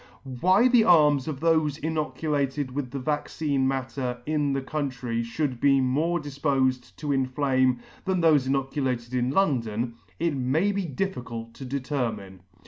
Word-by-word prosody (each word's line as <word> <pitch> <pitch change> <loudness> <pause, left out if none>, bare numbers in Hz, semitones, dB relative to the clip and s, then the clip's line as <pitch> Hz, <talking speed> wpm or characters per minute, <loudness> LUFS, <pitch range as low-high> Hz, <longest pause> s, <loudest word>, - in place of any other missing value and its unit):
Why 190 +7 +5
the 245 -3 +5
arms 150 -7 +5
of 150 -3 -4
thofe 160 -3 +2
inoculated 150 -3 -1
with 135 -1 -3
the 140 - -5
vaccine 145 0 -1
matter 130 -1 -2
in 150 -2 0
the 135 - -1
country 130 -5 -3
fliould 125 +2 -2
be 135 -1 +5
more 150 +7 +1
difpofed 135 -3 -1
to 150 -2 -3
inflame 130 -2 +1 0.2
than 185 -1 +1
thofe 155 -6 +4
inoculated 135 -3 -1
in 125 0 +1
London, 120 - 0 0.2
it 165 -3 0
may 140 +10 +1
be 200 -2 -2
difficult 125 -8 -4
to 135 - -9
determine. 125 -8 -3
140 Hz, 140 wpm, -26 LUFS, 130-155 Hz, 0.2 s, Why